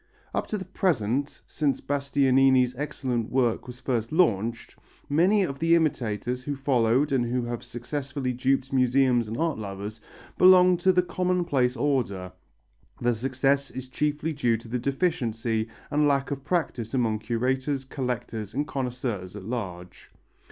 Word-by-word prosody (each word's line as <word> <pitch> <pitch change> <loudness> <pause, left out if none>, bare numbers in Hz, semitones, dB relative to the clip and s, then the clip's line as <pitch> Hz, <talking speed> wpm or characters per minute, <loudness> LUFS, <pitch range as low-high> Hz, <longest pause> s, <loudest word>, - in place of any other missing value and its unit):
Up - - -1
to 215 - -2
the 190 - -6
present, 145 - -1
since 145 -3 -1
Bastianini's 135 -2 +3
excellent 125 -4 -2
work 125 -2 +1
was 125 0 -9
first 115 -4 -2
launched, 115 - +1 0.3
many 185 +8 +3
of 140 -6 -4
the 165 +1 +4
imitators 125 -6 -1
who 145 +2 -3
followed 135 0 +2
and 130 -3 +2
who 120 +1 -1
have 120 0 -4
successfully 130 +1 -4
duped 135 +2 0
museums 125 -2 +3
and 110 +2 -4
art 165 -6 0
lovers, 105 +1 -6 0.4
belong 185 0 +7
to 185 +2 +3
the 180 -1 +3
commonplace 175 -8 0
order. 115 -9 -1 0.7
Their 120 0 +2
success 135 +4 0
is 130 0 -8
chiefly 150 +3 -1
due 120 -6 +1
to 115 - -13
the 125 +2 -2
deficiency 120 -7 -1 0.2
and 150 0 +3
lack 140 0 +1
of 135 -1 -4
practice 135 -9 -2
among 115 -4 +1
curators, 130 +5 -1
collectors 120 -5 -4
and 145 +2 0
connoisseurs 125 - -4
at 105 - -7
large. 90 -7 -6
130 Hz, 145 wpm, -26 LUFS, 115-145 Hz, 0.7 s, belong